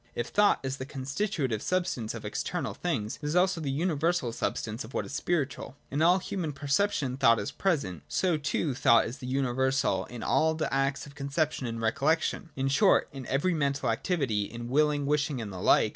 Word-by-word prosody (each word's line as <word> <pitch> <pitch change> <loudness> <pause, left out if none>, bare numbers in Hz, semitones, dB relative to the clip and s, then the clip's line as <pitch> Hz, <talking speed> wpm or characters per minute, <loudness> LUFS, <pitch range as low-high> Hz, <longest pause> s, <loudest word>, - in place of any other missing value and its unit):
If 120 0 -2
thought 205 0 +4
is 135 0 -3
the 130 - -5
constitutive 140 - -2
substance 180 -12 -1
of - - -7
external - - -3
things, 105 +2 -2
it - - -6
is 150 - -1
also 180 -1 +3
the 145 - -2
universal 160 -2 0
substance 115 0 -3
of 110 +5 -11
what - - -1
is - - -9
spiritual. 140 -6 -2 0.2
In 145 +3 -1
all 175 +3 +6
human 180 -4 -3
perception 140 -1 0
thought 115 -3 +5
is 100 - -3
present; 140 - -1
so 180 -3 +1
too 150 0 -1
thought 115 -2 +4
is 120 - -6
the 125 - -7
universal 130 -6 +1
in 120 -2 -8
all 160 0 +2
the 155 -3 -2
acts 135 0 0
of 140 - -12
conception 140 -1 -1
and 115 0 -4
recollection; 150 +9 0
in 135 0 -1
short, 135 +1 +4
in 135 -3 -8
every 145 +7 +1
mental 140 -5 0
activity, 115 - 0
in 120 +3 -7
willing, 145 +1 +2
wishing 145 -1 0
and 105 -4 -5
the 90 - -6
like. - - +4
140 Hz, 195 wpm, -29 LUFS, 120-160 Hz, 0.2 s, all